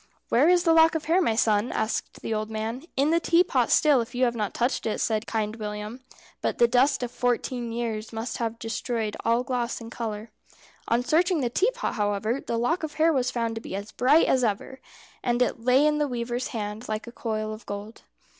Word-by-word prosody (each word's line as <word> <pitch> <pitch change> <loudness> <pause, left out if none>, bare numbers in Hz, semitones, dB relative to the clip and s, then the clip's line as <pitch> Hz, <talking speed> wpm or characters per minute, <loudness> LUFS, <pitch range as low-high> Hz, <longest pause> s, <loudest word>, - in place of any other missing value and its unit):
"Where 275 +8 +4
is 355 -1 +4
the 330 - +4
lock 325 0 +6
of 315 - -2
hair, 340 +4 +3
my 230 -10 +1
son?" 215 0 +2
asked 220 - -3
the 225 - -2
old 215 0 -2
man. 220 +5 -4
"In 285 +3 +3
the 335 - +4
teapot 340 +1 +2
still, 295 -5 +5
if 230 +2 -7
you 255 +1 +3
have 240 - +1
not 210 -4 -2
touched 245 0 0
it," 215 - -1
said 220 -1 0
Kind 220 0 -2
William; 210 +2 -5 0.4
"but - - -1
the 235 - +5
dust 255 +3 +3
of 240 - -3
fourteen 245 -1 -1
years 225 -2 -3
must 225 +1 -4
have 230 -1 -2
destroyed 225 -1 -3
all 235 +2 +2
gloss 250 -2 -2
and 230 -1 -9
colour." 220 -1 -5 0.6
On 235 +2 +2
searching 335 +3 +2
the 240 -2 -1
teapot, - - 0
however, 210 +4 -1
the 235 - -3
lock 280 +10 0
of 310 -1 -5
hair 320 +1 +3
was 255 -3 +1
found 230 -2 -2
to 225 - -5
be 190 - -6
as 200 +2 -6
bright 275 +8 +4
as 260 -1 +2
ever, 230 +4 -2 0.4
and 240 -1 +1
it 250 -2 0
lay 255 +4 +4
in 300 0 +2
the 295 - +1
weaver's 240 0 -3
hand 215 0 -5
like 215 0 -3
a 235 - -9
coil 215 -2 -3
of 215 - -11
gold. 205 +2 -7
235 Hz, 220 wpm, -26 LUFS, 220-265 Hz, 0.6 s, lock